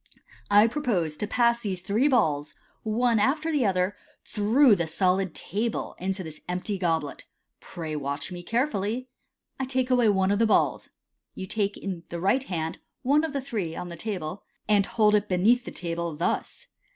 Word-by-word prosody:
I 205 Hz, +1 st, +7 dB
propose 220 Hz, -, 0 dB
to 210 Hz, -, -3 dB
pass 235 Hz, +1 st, +2 dB
these 195 Hz, -5 st, -2 dB
three 210 Hz, +9 st, +1 dB
balls, 155 Hz, -, +1 dB, 0.3 s
one 230 Hz, +1 st, +2 dB
after 305 Hz, +9 st, +1 dB
the 280 Hz, -8 st, +2 dB
other, 185 Hz, +1 st, +1 dB, 0.3 s
through 225 Hz, +3 st, +4 dB
the 170 Hz, -3 st, -1 dB
solid 185 Hz, +1 st, +1 dB
table 220 Hz, +4 st, -3 dB
into 190 Hz, +1 st, -2 dB
this 155 Hz, -2 st, -10 dB
empty 185 Hz, +3 st, -2 dB
goblet. 160 Hz, -5 st, -1 dB, 0.3 s
Pray 160 Hz, -3 st, -6 dB
watch 140 Hz, +3 st, -3 dB
me 175 Hz, -1 st, -6 dB
carefully. 235 Hz, +2 st, -1 dB, 0.5 s
I 265 Hz, -, -1 dB
take 260 Hz, 0 st, -1 dB
away 245 Hz, -3 st, +4 dB
one 190 Hz, -1 st, +2 dB
of 205 Hz, -, +1 dB
the 225 Hz, -, +4 dB
balls -, -, +2 dB, 0.5 s
(you 190 Hz, -, -5 dB
take 200 Hz, +1 st, -2 dB
in 185 Hz, -4 st, -5 dB
the 170 Hz, -, -4 dB
right 225 Hz, +9 st, +2 dB
hand 165 Hz, -5 st, -3 dB, 0.2 s
one 285 Hz, +4 st, +3 dB
of 320 Hz, -, -2 dB
the 280 Hz, -1 st, -2 dB
three 205 Hz, -11 st, -3 dB
on 180 Hz, -, -5 dB
the 170 Hz, -, -7 dB
table), 185 Hz, -2 st, -4 dB
" -, -, -47 dB
and 205 Hz, -2 st, +3 dB
hold 215 Hz, -2 st, +3 dB
it 210 Hz, 0 st, +2 dB
beneath 215 Hz, +7 st, +3 dB
the -, -, -5 dB
table, 170 Hz, -2 st, -4 dB
thus. 170 Hz, -, -2 dB
205 Hz, 180 wpm, -26 LUFS, 175-235 Hz, 0.5 s, I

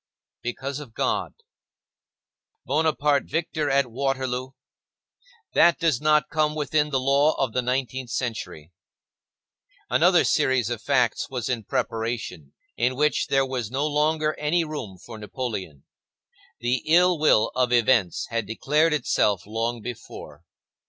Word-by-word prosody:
Because 130 Hz, +3 st, -4 dB
of 135 Hz, -7 st, -11 dB
God. -, -, -1 dB, 1.3 s
Bonaparte 150 Hz, -2 st, +1 dB
victor 160 Hz, -2 st, -1 dB
at 135 Hz, -3 st, +1 dB
Waterloo; 130 Hz, 0 st, -2 dB, 1.0 s
that 170 Hz, 0 st, +5 dB
does 160 Hz, -7 st, +1 dB
not 150 Hz, 0 st, +3 dB
come 150 Hz, 0 st, +1 dB
within 150 Hz, 0 st, 0 dB
the 135 Hz, -3 st, 0 dB
law 140 Hz, +3 st, +3 dB
of 130 Hz, -5 st, -1 dB
the 125 Hz, -, +1 dB
nineteenth 130 Hz, 0 st, -2 dB
century. 110 Hz, -, -4 dB, 1.2 s
Another -, -, +4 dB
series 125 Hz, -3 st, +1 dB
of 120 Hz, -2 st, -4 dB
facts 125 Hz, -4 st, +1 dB
was 125 Hz, -3 st, -4 dB
in 120 Hz, -4 st, -2 dB
preparation, 110 Hz, -13 st, -3 dB, 0.2 s
in 125 Hz, +2 st, 0 dB
which 150 Hz, +3 st, +1 dB
there 135 Hz, 0 st, +2 dB
was 125 Hz, -5 st, -4 dB
no 135 Hz, +4 st, -1 dB
longer 155 Hz, +1 st, +1 dB
any 160 Hz, +3 st, +1 dB
room 145 Hz, -, -6 dB
for 110 Hz, +4 st, -11 dB
Napoleon. 105 Hz, -, -5 dB, 0.8 s
The 120 Hz, +1 st, 0 dB
ill 175 Hz, +1 st, +4 dB
will 115 Hz, -7 st, +3 dB
of 125 Hz, -1 st, +1 dB
events 120 Hz, -6 st, +2 dB
had 115 Hz, -3 st, -2 dB
declared 150 Hz, +8 st, +1 dB
itself 105 Hz, -, +1 dB
long 115 Hz, +2 st, -3 dB
before. 75 Hz, -10 st, -9 dB
130 Hz, 130 wpm, -24 LUFS, 115-150 Hz, 1.3 s, that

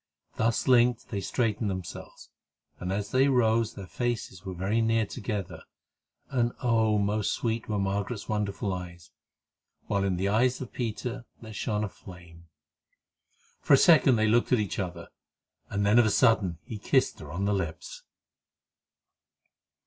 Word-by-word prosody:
Thus 115 Hz, 0 st, 0 dB
linked 125 Hz, -2 st, +3 dB
they 100 Hz, -3 st, -3 dB
straightened 110 Hz, +1 st, -1 dB
themselves, 95 Hz, -3 st, -7 dB, 0.5 s
and 90 Hz, +1 st, -4 dB
as 100 Hz, +1 st, -3 dB
they 130 Hz, +2 st, +4 dB
rose 115 Hz, -3 st, +2 dB
their 100 Hz, -, -7 dB
faces 115 Hz, -3 st, -3 dB
were 95 Hz, -2 st, -6 dB
very 100 Hz, +6 st, 0 dB
near 115 Hz, 0 st, +2 dB
together 105 Hz, -4 st, -5 dB, 0.7 s
and 120 Hz, -2 st, +1 dB
oh! 110 Hz, -3 st, +3 dB
most 105 Hz, +1 st, 0 dB
sweet 115 Hz, -1 st, -2 dB
were 105 Hz, -, 0 dB
Margaret's 100 Hz, +3 st, -2 dB
wonderful 105 Hz, -2 st, -2 dB
eyes; 85 Hz, -2 st, -8 dB, 0.7 s
while 100 Hz, -1 st, 0 dB
in 95 Hz, -2 st, 0 dB
the 95 Hz, +2 st, 0 dB
eyes 120 Hz, +5 st, +2 dB
of 130 Hz, -, -8 dB
Peter 120 Hz, +1 st, -4 dB, 0.2 s
there 110 Hz, -1 st, -9 dB
shone 105 Hz, 0 st, -2 dB
a -, -, -1 dB
flame. 85 Hz, -3 st, -14 dB, 1.1 s
For 140 Hz, -, +5 dB
a -, -, +5 dB
second 140 Hz, -5 st, +6 dB
they 110 Hz, -1 st, +2 dB
looked 120 Hz, +2 st, +2 dB
at 125 Hz, -, +5 dB
each 105 Hz, -3 st, -2 dB
other, 90 Hz, -3 st, -5 dB, 0.6 s
and 100 Hz, 0 st, -1 dB
then 105 Hz, +4 st, +5 dB
of 120 Hz, -, +5 dB
a -, -, +3 dB
sudden 105 Hz, -7 st, +3 dB
he 110 Hz, -, -7 dB
kissed 130 Hz, +5 st, +1 dB
her 75 Hz, -2 st, -9 dB
on 95 Hz, +5 st, -2 dB
the 105 Hz, -, +1 dB
lips. 85 Hz, -5 st, -4 dB
105 Hz, 155 wpm, -28 LUFS, 95-115 Hz, 1.1 s, second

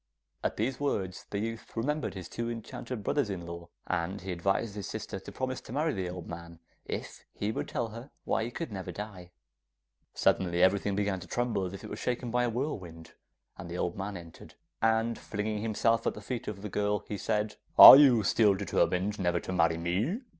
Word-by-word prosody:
At -, -, -1 dB
these 125 Hz, +5 st, -1 dB
words 95 Hz, -10 st, -2 dB
the 100 Hz, -, -3 dB
youth 115 Hz, +2 st, -5 dB
remembered 150 Hz, +1 st, -1 dB
his 90 Hz, -3 st, -6 dB
two 115 Hz, 0 st, -4 dB
enchanted 115 Hz, 0 st, -6 dB
brothers 140 Hz, 0 st, 0 dB
in 90 Hz, -3 st, -4 dB
law, 85 Hz, 0 st, -8 dB, 0.2 s
and 95 Hz, +1 st, -2 dB
he 95 Hz, +1 st, -5 dB
advised 95 Hz, +4 st, 0 dB
his 100 Hz, -1 st, -5 dB
sister 105 Hz, -3 st, -5 dB
to -, -, -10 dB
promise 130 Hz, -1 st, -3 dB
to -, -, -12 dB
marry 150 Hz, +3 st, 0 dB
the 95 Hz, -3 st, -3 dB
old 90 Hz, -2 st, -7 dB
man, 85 Hz, 0 st, -8 dB, 0.3 s
if -, -, -6 dB
he 105 Hz, +1 st, -1 dB
would -, -, -3 dB
tell 120 Hz, -5 st, -2 dB
her 115 Hz, +5 st, -9 dB, 0.2 s
why 110 Hz, -, +1 dB
he -, -, -4 dB
could 130 Hz, +2 st, -5 dB
never 95 Hz, -2 st, -5 dB
die. 95 Hz, -2 st, -8 dB, 0.9 s
Suddenly 90 Hz, -1 st, +2 dB
everything 100 Hz, +1 st, +3 dB
began 100 Hz, -2 st, 0 dB
to 90 Hz, -, -10 dB
tremble, 120 Hz, -6 st, -1 dB
as 90 Hz, -, -8 dB
if -, -, -10 dB
it -, -, -7 dB
was -, -, -5 dB
shaken 125 Hz, -1 st, -2 dB
by 125 Hz, +1 st, +2 dB
a -, -, 0 dB
whirlwind, 95 Hz, -, -5 dB, 0.5 s
and 85 Hz, -, -7 dB
the 85 Hz, -, -4 dB
old 85 Hz, -, -1 dB
man 100 Hz, 0 st, -4 dB
entered, 85 Hz, -2 st, -13 dB, 0.3 s
and 115 Hz, +1 st, +2 dB
flinging 105 Hz, 0 st, -3 dB
himself 115 Hz, +1 st, +1 dB
at -, -, 0 dB
the -, -, -7 dB
feet 125 Hz, -3 st, -5 dB
of 100 Hz, -1 st, -5 dB
the 105 Hz, -, -4 dB
girl, 105 Hz, +1 st, 0 dB
he 105 Hz, -, -3 dB
said: 105 Hz, +1 st, -1 dB, 0.2 s
'Are -, -, +14 dB
you 130 Hz, -6 st, +6 dB
still 105 Hz, 0 st, +4 dB
determined 100 Hz, 0 st, 0 dB
never 85 Hz, -2 st, +1 dB
to 95 Hz, -, -5 dB
marry 80 Hz, -2 st, +3 dB
me? 100 Hz, -, -1 dB
105 Hz, 210 wpm, -30 LUFS, 90-115 Hz, 0.9 s, Are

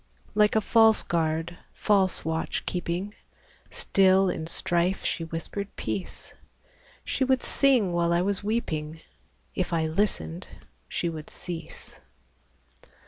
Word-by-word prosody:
Like 210 Hz, +1 st, +4 dB
a 220 Hz, -, +4 dB
false 225 Hz, 0 st, +5 dB
guard, 165 Hz, +1 st, -1 dB, 0.2 s
false 195 Hz, -6 st, +2 dB
watch 160 Hz, 0 st, -2 dB
keeping, 180 Hz, +3 st, -3 dB, 0.6 s
Still, 190 Hz, -1 st, +3 dB
in 160 Hz, -2 st, -5 dB
strife, 175 Hz, +2 st, 0 dB
she 165 Hz, -, -1 dB
whispered 165 Hz, +5 st, -5 dB
peace; 190 Hz, -, -5 dB, 0.7 s
She 270 Hz, -, 0 dB
would 260 Hz, -1 st, +2 dB
sing 250 Hz, -10 st, +3 dB
while 170 Hz, 0 st, +1 dB
I 170 Hz, +1 st, +3 dB
was 200 Hz, +1 st, -1 dB
weeping; 160 Hz, -8 st, -2 dB, 0.5 s
If 185 Hz, -, -2 dB
I 165 Hz, -1 st, +1 dB
listened, 155 Hz, -, -1 dB, 0.4 s
she -, -, -2 dB
would 160 Hz, -2 st, -6 dB
cease. 170 Hz, -2 st, -8 dB
180 Hz, 120 wpm, -27 LUFS, 165-205 Hz, 0.7 s, false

